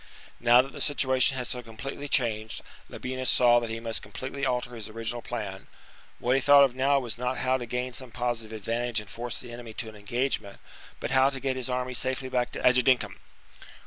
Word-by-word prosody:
Now 120 +1 +6
that 135 - -9
the - - -7
situation 130 -2 +3
had 125 - -2
so 125 +1 -3
completely 130 +5 -7
changed, 110 -5 0 0.3
Labienus 130 0 -2
saw 120 -1 +6
that 120 -1 -4
he 115 0 -3
must 115 -1 -3
completely 135 +1 -6
alter 125 -1 -1
his 110 -3 -6
original 115 +2 -4
plan: 105 -6 -5 0.5
what 125 - +1
he 135 - +3
thought 140 +1 +8
of 135 -3 +3
now 135 +2 +3
was 120 -3 -4
not 125 +1 -1
how 130 0 +2
to 120 -2 -6
gain 125 +2 -2
some 130 0 -5
positive 120 -2 -2
advantage 115 +2 -1
and 105 - -9
force 120 0 -5
the 120 - -9
enemy 120 -1 -8
to 110 0 -4
an 110 - -13
engagement, 105 0 -2 0.4
but - - -3
how 130 0 +5
to 135 -1 -5
get 130 0 -1
his 130 -1 -3
army 125 0 -2
safely 130 +1 -1
back 125 -1 0
to - - -4
Agedincum. 125 -5 +3
125 Hz, 210 wpm, -28 LUFS, 115-130 Hz, 0.5 s, thought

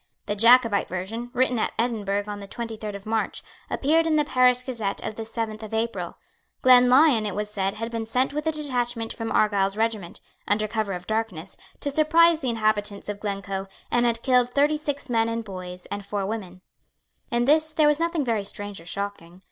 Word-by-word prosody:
The 205 - -2
Jacobite 230 -1 +5
version, 215 +7 -4
written 250 -1 +1
at - - -1
Edinburgh 210 -4 0
on 205 -1 -6
the 200 - -9
twenty 230 +1 -5
third 210 -1 -6
of 200 - -9
March, 220 0 -2 0.3
appeared 325 +4 +2
in 315 - +2
the 300 -1 +3
Paris 250 -2 +3
Gazette 225 -6 -2
of - - -3
the 225 - -6
seventh 225 -1 -4
of 220 0 -5
April. 230 +1 -2 0.5
Glenlyon, 250 -1 +6
it 195 - -4
was 210 0 -3
said, 195 -1 -1
had 225 +1 -5
been 225 -1 -3
sent 255 +4 +1
with 300 +2 -3
a - - +3
detachment 245 -6 -2
from 225 -1 -5
Argyle's 200 -2 +2
regiment, 220 -6 -2 0.3
under 215 +1 +1
cover 215 -2 -2
of 180 0 -6
darkness, 215 -5 -3 0.3
to 285 - -2
surprise 325 +2 +4
the 265 -5 -2
inhabitants 215 -3 -1
of 205 -1 -4
Glencoe, 195 -2 -4 0.2
and 240 0 +3
had 230 -1 0
killed 250 -2 +3
thirty 290 +4 +2
six 290 -1 -4
men 230 -2 +1
and 230 0 -2
boys 180 -2 -8
and 205 0 -4
four 200 0 -3
women. 190 -4 -5 0.7
In 240 0 +1
this 310 +3 +3
there 310 -1 +3
was 295 0 +3
nothing 335 -3 0
very 225 -4 0
strange 205 -2 -5
or 165 - -15
shocking. 185 -2 -5
225 Hz, 200 wpm, -25 LUFS, 205-250 Hz, 0.7 s, Glenlyon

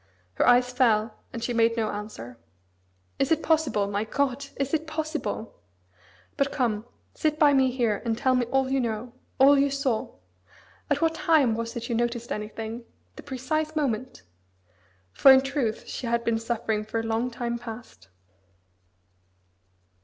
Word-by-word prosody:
Her - - +1
eyes 245 0 +5
fell, 225 -4 +2 0.2
and 230 - -6
she 245 - -1
made 230 0 +2
no 220 -2 0
answer. 165 - -8 0.8
"Is 275 - +1
it 325 0 +2
possible, 310 -10 +2
my 205 +1 -1
God, 280 +4 -1
is 275 +1 -3
it 320 0 0
possible? 310 -7 -4 0.8
But 275 0 +1
come, 230 -4 -1 0.3
sit 305 -1 0
by 295 -2 +5
me 265 -1 +4
here, 235 -5 0
and 230 -2 -1
tell 260 +1 +2
me 250 -2 +1
all 265 +1 +1
you 270 - +2
know, 235 0 -3 0.3
all 275 +1 +7
you 280 +1 +3
saw. 275 -5 -2 0.7
At - - +1
what 325 -1 +2
time 320 -9 +3
was 230 +2 -4
it 235 0 -4
you 240 - -2
noticed 235 0 -2
anything 220 +2 -5 0.3
the - - -9
precise 310 +4 -3
moment?" 255 - -2 0.9
For 270 - +7
in 265 0 +7
truth 270 -5 -2
she 250 - -5
had 235 0 0
been 230 -1 +1
suffering 225 -2 -2
for 215 +1 -3
a - - -3
long 225 +2 -1
time 235 -1 -3
past. 225 - -10
240 Hz, 160 wpm, -26 LUFS, 225-275 Hz, 0.9 s, all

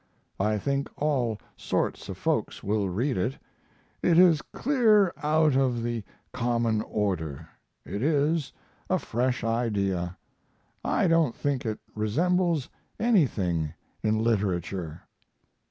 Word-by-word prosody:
I 105 +2 +2
think 140 +5 -1
all 130 -7 +1 0.2
sorts - - -2
of - - -5
folks - - -1
will 100 -1 0
read 120 +8 0
it. 120 +9 -1 0.6
It 170 -2 +3
is 170 -4 +6
clear 220 -9 +3
out 155 -1 +3
of 125 -3 +1
the 120 -2 -2 0.3
common 115 -3 +1
order 90 -11 -2 0.4
it 100 - -4
is 150 +1 +1 0.4
a - - +3
fresh 125 +2 -1
idea 100 -6 -1 0.7
I - - +2
don't 165 -7 +3
think 140 -4 -1
it 110 - -2 0.2
resembles 165 - +1 0.3
anything 100 - +1 0.3
in 110 0 +1
literature. 95 -6 -1
120 Hz, 115 wpm, -27 LUFS, 105-150 Hz, 0.7 s, is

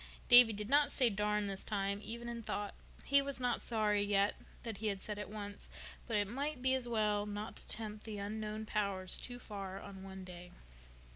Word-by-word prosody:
Davy 245 -2 +10
did 210 0 -4
not 290 +3 +4
say 250 -4 +4
"darn" 210 +1 +1
this 195 -1 -2
time, 200 -1 -1
even 235 +3 -5
in 235 -1 -4
thought. 205 -2 -3 0.3
He 280 0 +6
was 275 -2 -3
not 245 -1 0
sorry—yet—that 210 0 0
he 220 - -2
had 200 -2 0
said 210 -1 -4
it 210 - -5
once, 205 -1 -7 0.4
but 225 -3 +1
it 205 -1 +2
might 280 +5 -2
be 260 +1 +3
as 260 -2 0
well 210 -3 +1
not 210 +1 -5
to - - -10
tempt 215 -1 -1
the 215 -2 -5
Unknown 215 +1 -3
Powers 200 -4 -1
too 245 -1 -5
far 195 -5 -6
on 195 -1 -9
one 190 0 -8
day. 180 -1 -9
210 Hz, 195 wpm, -36 LUFS, 200-235 Hz, 0.4 s, Davy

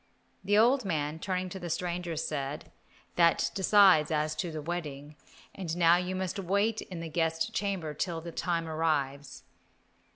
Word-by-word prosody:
The 205 +2 +2
old 245 +4 +4
man, 155 -4 -2
turning 185 0 -2
to 190 - -7
the 175 -1 -6
stranger, 175 0 -2
said, 145 -2 -4 0.5
"That 170 -1 +3
decides 190 -5 +5
as 155 0 0
to 170 +3 -2
the 155 - -5
wedding, 150 -3 -5 0.4
and 175 -3 -4
now 170 0 +5
you 180 +1 -2
must 185 +1 -3
wait 200 +4 0
in 175 -3 -7
the 165 - -5
guest 165 +6 -1
chamber 190 -8 -2
till 165 +2 -2
the 170 +1 -8
time 170 -1 -2
arrives." 145 -4 -2
170 Hz, 160 wpm, -29 LUFS, 155-185 Hz, 0.5 s, decides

